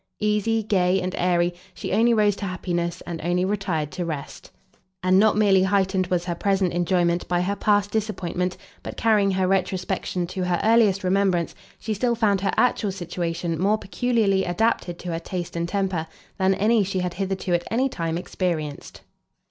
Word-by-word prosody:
Easy, 210 +1 +1
gay, 190 -2 +2
and 185 0 -3
airy, 175 -1 +1 0.2
she - - -4
only 230 +4 +4
rose 210 -3 +3
to 200 - -5
happiness, 175 -2 -3
and 170 -2 -5
only 175 +2 +1
retired 185 -7 -2
to 180 - -3
rest; 155 -4 -6 0.5
and 185 +1 +4
not 215 0 +4
merely 200 -3 +4
heightened 190 -1 +1
was 175 -1 -1
her 175 - -1
present 190 0 0
enjoyment 175 0 +1
by 175 0 +1
her 200 +3 -1
past 205 -1 +1
disappointment, 185 -4 -2 0.2
but, - - -8
carrying 210 -3 +3
her 190 -1 +1
retrospection 185 -1 -1
to 185 +1 -4
her 180 -1 0
earliest 215 -4 +4
remembrance, 185 -2 +1 0.2
she 220 - -3
still 235 +3 0
found 205 -4 +2
her 200 - 0
actual 230 -4 +2
situation 170 -2 -3
more 205 +3 +3
peculiarly 215 -2 +1
adapted 175 -1 0
to 180 - -7
her 165 - -2
taste 175 0 -5
and 170 0 -2
temper, 190 -5 -1 0.3
than 190 0 +3
any 220 +2 +3
she 190 0 -3
had 180 -1 -2
hitherto 190 -1 -2
at 175 0 0
any 255 +4 +1
time 165 -9 -3
experienced. 165 -5 -4
185 Hz, 175 wpm, -24 LUFS, 175-205 Hz, 0.5 s, only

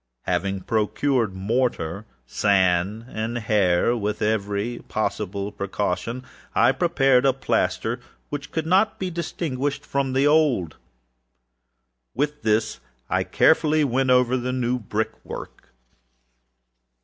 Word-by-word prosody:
Having 95 +2 -1
procured 110 +1 0
mortar, 105 -2 -1 0.2
sand, 95 - +1
and 115 0 -3
hair, 105 -1 +2
with 105 -2 -2
every 105 +2 -1
possible 100 -2 -2
precaution, 105 +5 -3 0.3
I - - +5
prepared 135 -3 +3
a 135 -1 +4
plaster 135 0 -1 0.3
which 145 -1 -5
could 160 -1 -2
not 190 +6 +3
be 185 -1 -3
distinguished 145 -4 -3
from 135 -1 -1
the 135 +2 +3
old, 145 - +3
and - - -28 1.4
with 145 +3 -1
this 110 -1 +1 0.3
I - - +3
very - - -3
carefully 155 -1 +4
went 130 -1 +1
over 125 0 +4
the 125 0 -2
new 125 0 0
brickwork. 110 0 -5
120 Hz, 115 wpm, -24 LUFS, 105-135 Hz, 1.4 s, I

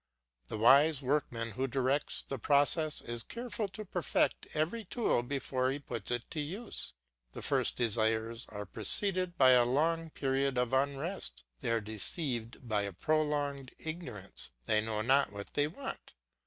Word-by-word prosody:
The - - -4
wise 140 +6 +6
workman 125 -4 0
who 130 +5 -1
directs 135 +2 0
the 135 - -5
process 145 +4 +2
is 120 0 -4
careful 235 - -4
to 195 +3 -8
perfect 175 -2 0
every 170 +10 0
tool 215 - +1
before 130 0 -1
he 135 - -1
puts 120 -7 -5
it 120 -1 0
to 155 - -3
use; 180 - -3 0.4
the - - -7
first - - +2
desires 115 0 +1
are 105 -1 -6
preceded 180 - +1
by 130 -1 +7
a 125 -1 +7
long 160 +6 +1
period 135 -2 0
of 125 0 +1
unrest, 140 - -1 0.2
they - - -3
are 115 -1 +2
deceived 115 - -3
by 105 -2 +1
a 100 -1 -3
prolonged 145 - 0
ignorance, 135 - -5 0.2
they 105 0 +3
know 110 -1 -2
not 135 0 +4
what 100 0 -8
they 145 0 +2
want. 265 - -7
135 Hz, 155 wpm, -32 LUFS, 115-155 Hz, 0.4 s, by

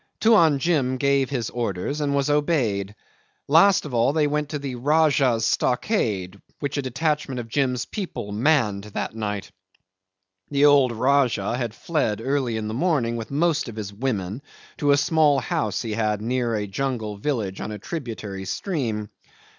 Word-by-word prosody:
Tuan 170 -10 +5
Jim 135 -4 +1
gave 140 -1 +2
his 125 -5 -2
orders 120 +5 -2
and 140 -1 0
was 140 0 +1
obeyed. 130 - 0 0.5
Last 170 +6 +5
of 145 - -7
all 120 +4 +3
they 155 -1 +2
went 150 0 -1
to 150 - -3
the 140 -2 -5
Rajah's 135 -3 +2
stockade, 100 - 0 0.2
which 140 -1 -3
a - - +1
detachment 140 0 -1
of 115 - -6
Jim's 125 0 0
people 180 - -5
manned 105 -4 +1
on - - -12
that - - -3
night. 105 -3 -4 1.0
The 140 0 +3
old 140 -4 +5
Rajah 120 -3 +1
had 120 -3 -3
fled 115 -8 -1
early 130 -2 -1
in 110 -1 -3
the 110 - -4
morning 130 -5 +1
with 115 -1 -5
most 150 -1 +1
of 110 - -9
his 105 -2 -6
women 105 -1 -3 0.4
to 145 - 0
a 140 - +6
small 150 -1 +3
house 110 -5 -1
he 110 -2 -3
had 105 -1 0
near 120 +1 -1
a 105 -1 -1
jungle 110 -1 -3
village 105 -5 -2
on - - -4
a 105 - -5
tributary 110 - -6
stream. 110 - -3
125 Hz, 170 wpm, -24 LUFS, 110-145 Hz, 1.0 s, a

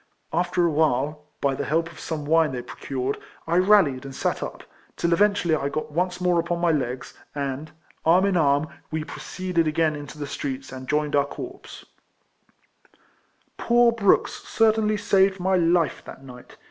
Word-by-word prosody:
After 175 +1 +1
awhile, 150 -2 +1 0.2
by 140 -1 +2
the 140 - -3
help 165 +4 0
of 160 - -14
some 155 -3 -4
wine 160 -1 +3
they 125 -1 -4
pro - - -10
cured, 135 0 -3 0.3
1 175 +3 +2
rallied 155 -11 +4
and 135 -1 -8
sat - - -1
up, - - -6 0.3
till 170 0 +1
eventually 200 -3 +3
1 140 -2 -2
got 155 +1 -4
once 180 +3 -1
more 180 -1 +2
upon 170 +1 -1
my 170 -1 +3
legs, 130 -4 -2 0.2
and, 140 +2 -3 0.3
arm 175 +4 +4
in 200 -2 +1
arm, 145 -2 +3 0.2
we 160 0 -2
proceeded 170 +2 -2
again 155 0 +1
into 145 0 -9
the 145 - -4
streets, 135 -1 -5
and 130 -1 -8
joined 150 0 +1
our 140 0 +3
corps. 370 - -9 1.7
Poor 240 0 +4
Brooks 220 -4 +2
cer 225 -1 +3
tainly 215 -1 0
saved 195 -1 +3
my 190 +1 +1
life 170 -2 +2
that 135 - -11
night. 125 -2 -13
160 Hz, 170 wpm, -24 LUFS, 140-180 Hz, 1.7 s, rallied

